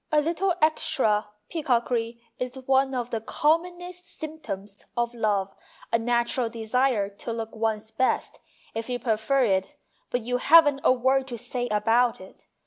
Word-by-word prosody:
A 305 - +5
little 340 +4 0
extra 220 -9 +2 0.2
peacockry 240 -6 0 0.2
is 250 +1 -3
one 265 0 +3
of 245 0 -3
the 225 -2 -2
commonest 350 +7 -1
symptoms 205 -11 -7
of 240 0 0
love 205 -4 0 0.4
a 230 - +4
natural 240 +1 +1
desire 230 -1 +1
to 200 +4 -7
look 225 -1 -5
one's 220 -1 -2
best 255 +3 0 0.3
if 225 +2 -4
you 245 - -1
prefer 235 +3 +1
it 190 -3 0 0.3
but 245 -1 -1
you 245 +2 0
haven't 290 0 +6
a - - +6
word 260 +1 +2
to 240 -2 -5
say 245 +1 -3
about 230 +3 +2
it. 190 0 -15
245 Hz, 150 wpm, -26 LUFS, 225-270 Hz, 0.4 s, haven't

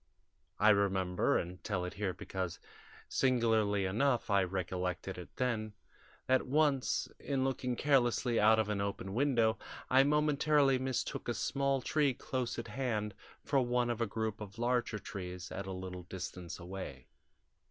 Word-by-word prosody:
I 105 - +5
remember 95 -3 +2
and 90 +2 -5
tell 95 -4 -1
it 90 - -5
here 100 -2 -1
because, 90 0 -4 0.5
singularly 110 -6 +2
enough, 120 +4 +1
I 100 -1 +4
recollected 90 0 -3
it 90 - -11
then 110 -4 -1 0.5
that 130 0 +2
once, 140 -1 +2
in 135 -2 -1
looking 125 -2 -1
carelessly 125 -3 +2
out 110 +1 +6
of 110 -2 +2
an 100 -1 0
open 100 -1 -3
window, 115 -3 +2 0.3
I 130 +1 +7
momentarily 150 -2 +3
mistook 130 -1 -2
a 120 - 0
small 135 -1 0
tree 145 -4 +2
close 130 -1 -3
at 115 -1 -5
hand 110 -4 -2 0.3
for 140 - +2
one 120 -1 +1
of 120 0 -3
a 115 - +2
group 110 0 -3
of 105 +1 -8
larger 120 -2 0
trees 90 -3 -7
at 100 0 -5
a - - -4
little 90 -1 -6
distance 90 -1 -6
away. 85 -8 -7
110 Hz, 150 wpm, -33 LUFS, 95-130 Hz, 0.5 s, I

